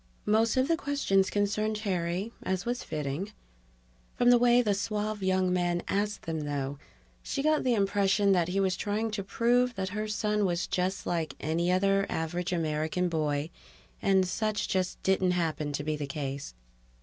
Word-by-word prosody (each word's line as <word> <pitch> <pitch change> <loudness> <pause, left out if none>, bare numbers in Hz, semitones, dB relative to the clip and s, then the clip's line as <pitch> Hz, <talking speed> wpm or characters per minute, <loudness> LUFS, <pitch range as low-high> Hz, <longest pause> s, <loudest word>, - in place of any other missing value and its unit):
Most 220 +3 +2
of 260 +1 +3
the 330 - +3
questions 280 - +1
concerned 210 +1 0
Terry, 190 0 -2
as 190 0 -2
was 245 +1 -2
fitting. 150 +7 -4 0.8
From 245 0 +4
the 245 - +6
way 245 0 +5
the 210 -3 +2
suave 210 +1 -2
young 185 -1 +2
man 175 -1 0
asked 205 +1 -1
them, 160 -1 -3
though, 140 -2 -3 0.4
she 275 - -3
got 310 0 +2
the 250 -2 +2
impression 200 0 +2
that 175 -3 +3
he 185 +2 -1
was 190 -1 +2
trying 215 +2 -2
to 205 -2 -3
prove 240 +5 +2
that 190 -1 -2
her 210 +2 -3
son 210 0 0
was 175 -2 0
just 185 +2 -1
like 165 -2 -2
any 170 +3 0
other 195 +1 +2
average 175 +3 -2
American 160 +1 0
boy, 155 -1 -1 0.5
and 190 -1 +3
such 215 +3 -1
just 185 -2 -1
didn't 190 -1 +2
happen 155 -3 -1
to 145 0 -3
be 155 +1 -1
the 145 -1 -4
case. 135 - -5
190 Hz, 175 wpm, -29 LUFS, 170-215 Hz, 0.8 s, the